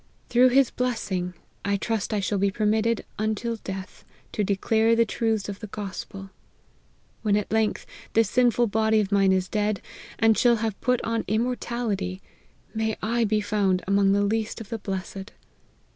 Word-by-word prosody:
Through 250 Hz, +1 st, +6 dB
his 265 Hz, 0 st, +4 dB
blessing, 190 Hz, -8 st, -2 dB, 0.3 s
I 200 Hz, 0 st, +1 dB
trust 220 Hz, +1 st, -2 dB
I 210 Hz, -, +1 dB
shell 195 Hz, +1 st, -1 dB
be 200 Hz, +1 st, +3 dB
permitted, 215 Hz, +2 st, +1 dB
until 220 Hz, +2 st, -1 dB
death, 190 Hz, -2 st, -7 dB, 0.3 s
to 210 Hz, -, -1 dB
declare 220 Hz, +3 st, +2 dB
the 230 Hz, 0 st, +4 dB
truths 220 Hz, -2 st, -1 dB
of 200 Hz, -1 st, -6 dB
the 215 Hz, -, -7 dB
gospel. 195 Hz, -1 st, -7 dB, 0.9 s
When, 210 Hz, -2 st, +2 dB
at 210 Hz, -, -3 dB
length, 220 Hz, -1 st, +1 dB, 0.3 s
this 225 Hz, -1 st, +4 dB
sinful 240 Hz, +1 st, +3 dB
body 220 Hz, 0 st, +2 dB
of 205 Hz, -1 st, -1 dB
mine 195 Hz, -1 st, +4 dB
is 185 Hz, -1 st, +1 dB
dead, 210 Hz, -1 st, 0 dB, 0.4 s
and 225 Hz, 0 st, +4 dB
shall 240 Hz, +1 st, +4 dB
have 220 Hz, -2 st, -3 dB
put 250 Hz, -1 st, +1 dB
on 230 Hz, 0 st, -1 dB
im 220 Hz, +2 st, +2 dB
mortality, 230 Hz, -7 st, -2 dB, 0.5 s
may 220 Hz, -1 st, -1 dB
I 230 Hz, +2 st, +1 dB
be 215 Hz, 0 st, +1 dB
found 200 Hz, -3 st, +1 dB
among 200 Hz, 0 st, +3 dB
the 205 Hz, 0 st, +2 dB
least 220 Hz, +2 st, -1 dB
of 220 Hz, -3 st, -9 dB
the 230 Hz, -, -4 dB
blessed 195 Hz, 0 st, -5 dB
215 Hz, 170 wpm, -25 LUFS, 200-225 Hz, 0.9 s, Through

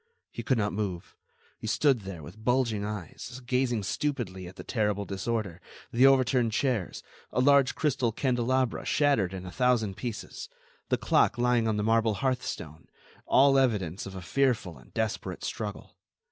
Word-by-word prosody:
He -, -, -6 dB
could 130 Hz, -, +1 dB
not 105 Hz, -2 st, 0 dB
move. 95 Hz, -4 st, -4 dB, 0.4 s
He -, -, -6 dB
stood 140 Hz, -5 st, +3 dB
there, 95 Hz, -5 st, -8 dB
with 110 Hz, +9 st, -12 dB
bulging 120 Hz, -4 st, +1 dB
eyes, 105 Hz, +4 st, -6 dB
gazing 125 Hz, -3 st, 0 dB
stupidly 110 Hz, -, -3 dB
at 90 Hz, -, -11 dB
the -, -, -9 dB
terrible 105 Hz, -3 st, -1 dB
disorder, 95 Hz, -2 st, -3 dB, 0.3 s
the 125 Hz, +3 st, +6 dB
overturned 130 Hz, -3 st, +3 dB
chairs, 120 Hz, -7 st, -1 dB, 0.3 s
a -, -, -1 dB
large 140 Hz, 0 st, +4 dB
crystal 135 Hz, -6 st, +1 dB
candelabra 130 Hz, +1 st, 0 dB
shattered 140 Hz, -11 st, +2 dB
in 95 Hz, -1 st, -6 dB
a 90 Hz, -, -7 dB
thousand 115 Hz, -4 st, +1 dB
pieces, 120 Hz, -4 st, -6 dB, 0.4 s
the -, -, +2 dB
clock -, -, +2 dB
lying 120 Hz, -1 st, +2 dB
on 110 Hz, -1 st, 0 dB
the 105 Hz, -, 0 dB
marble 115 Hz, 0 st, +2 dB
hearthstone, 125 Hz, -, -3 dB, 0.4 s
all 135 Hz, 0 st, +5 dB
evidence 100 Hz, -8 st, 0 dB
of 95 Hz, -, -9 dB
a 95 Hz, -, -7 dB
fearful 120 Hz, -7 st, 0 dB
and -, -, -19 dB
desperate 110 Hz, -1 st, -2 dB
struggle. 100 Hz, -7 st, -5 dB
115 Hz, 160 wpm, -28 LUFS, 100-130 Hz, 0.4 s, the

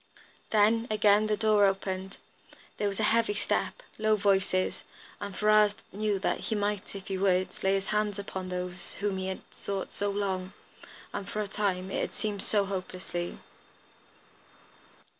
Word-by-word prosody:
Then, 220 Hz, +2 st, +4 dB
again 215 Hz, 0 st, +4 dB
the 210 Hz, 0 st, +1 dB
door 215 Hz, -1 st, +5 dB
opened, 190 Hz, 0 st, -2 dB, 0.6 s
there 205 Hz, -, +1 dB
was 200 Hz, 0 st, -3 dB
a -, -, +1 dB
heavy 230 Hz, -2 st, +2 dB
step, -, -, -1 dB, 0.2 s
low 215 Hz, 0 st, +4 dB
voices, 195 Hz, -2 st, +1 dB, 0.4 s
and 200 Hz, -2 st, -5 dB
Ferrars 210 Hz, -1 st, +5 dB, 0.2 s
knew 210 Hz, 0 st, 0 dB
that 190 Hz, -, 0 dB
he 220 Hz, -, -2 dB
might, 205 Hz, -1 st, -2 dB
if 195 Hz, -1 st, -7 dB
he 190 Hz, -1 st, -3 dB
would, 185 Hz, -1 st, +3 dB
lay 190 Hz, 0 st, +4 dB
his 195 Hz, +1 st, -2 dB
hand 210 Hz, -1 st, +1 dB
upon 190 Hz, -2 st, -5 dB
those 180 Hz, 0 st, -2 dB
whom 200 Hz, -1 st, -1 dB
he 190 Hz, -, -2 dB
had 190 Hz, -, -4 dB
sought 195 Hz, -1 st, -4 dB
so 205 Hz, -, -1 dB
long, 190 Hz, -2 st, -2 dB, 0.6 s
and, 195 Hz, -, -4 dB
for 215 Hz, -, -3 dB
a 210 Hz, -, -2 dB
time, 195 Hz, -2 st, -1 dB
it -, -, 0 dB
had -, -, -2 dB
seemed, 210 Hz, -2 st, -2 dB
so 205 Hz, -2 st, +2 dB
hopelessly. 185 Hz, -2 st, -4 dB
200 Hz, 160 wpm, -29 LUFS, 190-210 Hz, 0.6 s, door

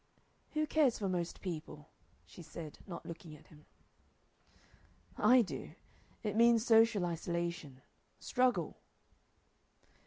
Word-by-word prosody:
"Who 310 Hz, 0 st, +1 dB
cares 300 Hz, -6 st, +3 dB
for 200 Hz, -, -2 dB
most 175 Hz, -2 st, -3 dB
people?" 155 Hz, -4 st, -7 dB, 0.3 s
she -, -, -13 dB
said, 160 Hz, -1 st, -9 dB
not 175 Hz, -, -7 dB
looking 165 Hz, -2 st, -9 dB
at 150 Hz, -, -18 dB
him. 150 Hz, -1 st, -17 dB, 1.5 s
"I 250 Hz, -1 st, +5 dB
do. 195 Hz, -, -7 dB, 0.5 s
It 210 Hz, -2 st, -2 dB
means 230 Hz, 0 st, +5 dB
social 225 Hz, -5 st, +5 dB
isolation 170 Hz, -5 st, -4 dB, 0.3 s
struggle." 255 Hz, -1 st, 0 dB
180 Hz, 105 wpm, -34 LUFS, 165-230 Hz, 1.5 s, I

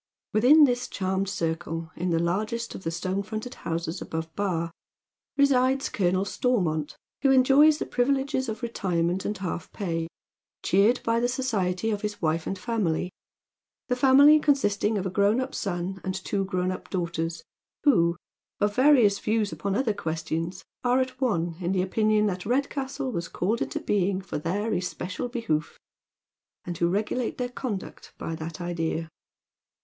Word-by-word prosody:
Within 265 Hz, +8 st, +7 dB
this 245 Hz, -3 st, +2 dB
charmed 190 Hz, 0 st, -1 dB
circle, 165 Hz, -2 st, -3 dB
in 180 Hz, +1 st, -2 dB
the 165 Hz, -, +2 dB
largest 210 Hz, +8 st, -1 dB
of -, -, -8 dB
the 165 Hz, -, -1 dB
stone 185 Hz, +4 st, -2 dB
fronted 215 Hz, +4 st, -5 dB
houses 165 Hz, +2 st, -4 dB
above 160 Hz, -1 st, -5 dB
Bar, 170 Hz, -5 st, -1 dB, 0.7 s
resides 270 Hz, -1 st, +3 dB
Colonel 185 Hz, 0 st, +1 dB
Stormont, 175 Hz, -, 0 dB, 0.3 s
who 275 Hz, -, +4 dB
eajoys 275 Hz, +4 st, +6 dB
the -, -, -3 dB
privi 255 Hz, +3 st, +2 dB
leges 270 Hz, -2 st, -2 dB
of 220 Hz, +3 st, -5 dB
retirement 180 Hz, -5 st, -1 dB
and 210 Hz, -, -2 dB
half 180 Hz, -3 st, -4 dB
pay, 165 Hz, -5 st, -2 dB, 0.6 s
cheered 205 Hz, +7 st, +3 dB
by 230 Hz, 0 st, +2 dB
the 240 Hz, -, +2 dB
society 220 Hz, -6 st, -1 dB
of 205 Hz, -1 st, -2 dB
his 210 Hz, -1 st, -4 dB
wife 160 Hz, 0 st, 0 dB
and 195 Hz, -, -2 dB
family, 185 Hz, -5 st, -1 dB, 0.8 s
the 250 Hz, -, +2 dB
family 280 Hz, +4 st, +7 dB
consisting 220 Hz, -8 st, +2 dB
of 195 Hz, -, -2 dB
a 190 Hz, -, -2 dB
grown 200 Hz, +4 st, +3 dB
up 260 Hz, +1 st, -3 dB
son 190 Hz, -1 st, -3 dB
and 185 Hz, 0 st, -2 dB
two 195 Hz, +1 st, -2 dB
grown 185 Hz, -1 st, -1 dB
up 185 Hz, -, -7 dB
daughters 170 Hz, -2 st, -2 dB, 0.4 s
who, 170 Hz, -, +4 dB, 0.4 s
of 205 Hz, 0 st, +1 dB
various 250 Hz, -7 st, +5 dB
views 215 Hz, -1 st, 0 dB
upon 200 Hz, -1 st, -2 dB
other 245 Hz, -3 st, +1 dB
ques 160 Hz, -3 st, -4 dB
tions, 165 Hz, +4 st, -3 dB, 0.2 s
are 250 Hz, +1 st, +3 dB
at 255 Hz, 0 st, -3 dB
one 170 Hz, -9 st, 0 dB
in 180 Hz, 0 st, -1 dB
the 185 Hz, -, +2 dB
opinion 215 Hz, +2 st, +2 dB
that 185 Hz, -3 st, -2 dB
Redcastle 270 Hz, +2 st, -1 dB
was 170 Hz, -5 st, -3 dB
called 210 Hz, +8 st, -1 dB
into -, -, -2 dB
being 195 Hz, -2 st, +1 dB
for 190 Hz, -5 st, -5 dB
their 205 Hz, +8 st, -1 dB
especial 185 Hz, +4 st, -3 dB
behoof, 195 Hz, -11 st, -2 dB, 0.9 s
and 175 Hz, -, -4 dB
who 170 Hz, -, +3 dB
regulate 220 Hz, +5 st, -1 dB
their 250 Hz, -1 st, -2 dB
conduct 240 Hz, -6 st, -6 dB
by 165 Hz, -, -4 dB
that 160 Hz, +1 st, -6 dB
idea. 165 Hz, -2 st, -2 dB
200 Hz, 165 wpm, -26 LUFS, 175-245 Hz, 0.9 s, Within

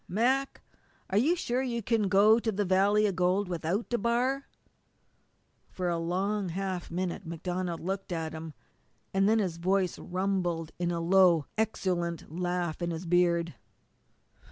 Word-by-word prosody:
"Mac, 260 Hz, +8 st, 0 dB, 0.5 s
are 195 Hz, -, +2 dB
you 310 Hz, +10 st, +3 dB
sure 255 Hz, -7 st, -1 dB
you 235 Hz, -3 st, -2 dB
can 220 Hz, -1 st, +1 dB
go 205 Hz, +3 st, +5 dB
to 225 Hz, -1 st, -1 dB
the 205 Hz, 0 st, -1 dB
valley 200 Hz, +3 st, +3 dB
of 200 Hz, -3 st, 0 dB
gold 185 Hz, +2 st, +1 dB
without 175 Hz, +5 st, -2 dB
DeBar?" 245 Hz, +4 st, 0 dB, 1.2 s
For 180 Hz, -1 st, -2 dB
a 170 Hz, -1 st, 0 dB
long 190 Hz, +4 st, -1 dB
half 185 Hz, 0 st, -3 dB
minute 180 Hz, +2 st, -3 dB
MacDonald 175 Hz, +1 st, -3 dB
looked 190 Hz, +2 st, -4 dB
at 160 Hz, -2 st, -3 dB
him, 160 Hz, -2 st, -7 dB, 0.6 s
and 195 Hz, +1 st, +3 dB
then 225 Hz, -, +4 dB
his 185 Hz, -6 st, -1 dB
voice 185 Hz, +1 st, 0 dB
rumbled 180 Hz, -3 st, -2 dB
in 175 Hz, -1 st, 0 dB
a 170 Hz, -1 st, -1 dB
low, 175 Hz, -3 st, +4 dB
exultant 180 Hz, -7 st, -2 dB
laugh 175 Hz, -2 st, -2 dB
in 170 Hz, -, -1 dB
his 165 Hz, +1 st, -4 dB
beard. 170 Hz, -1 st, +2 dB
185 Hz, 150 wpm, -29 LUFS, 170-205 Hz, 1.2 s, go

